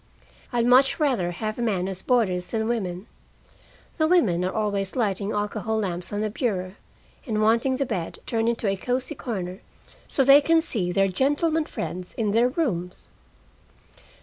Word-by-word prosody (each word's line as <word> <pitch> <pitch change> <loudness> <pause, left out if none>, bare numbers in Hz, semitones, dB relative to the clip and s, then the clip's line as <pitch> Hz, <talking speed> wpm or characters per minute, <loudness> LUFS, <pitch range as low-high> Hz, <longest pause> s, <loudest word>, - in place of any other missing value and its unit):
I'd 240 -2 +1
much 260 +5 +5
rather 255 - +1
have 215 +6 -4
men 200 -6 0
as 190 -1 -5
boarders 185 -8 +1
than 220 -1 -1
women. 190 -5 -2 0.9
The 315 -2 +3
women 220 - +3
are 185 - -1
always 200 -2 -2
lighting 205 -4 0
alcohol 210 +1 -2
lamps 180 -4 -2
on 205 0 -2
the 215 -1 -1
bureau, 190 -6 -2 0.5
and 215 -2 -1
wanting 230 +5 +3
the 275 +1 -1
bed 175 -9 -3
turned 225 -1 0
into 230 -2 -1
a 195 - +1
cozy 250 +6 -2
corner 190 -6 -5 0.5
so 270 - +1
they 275 +2 +8
can 330 +3 +4
see 210 - -2
their 195 +1 +3
gentlemen 290 - +1
friends 180 - -6
in 215 -3 0
their 230 +3 +4
rooms. 190 - -3
215 Hz, 160 wpm, -25 LUFS, 185-250 Hz, 0.9 s, they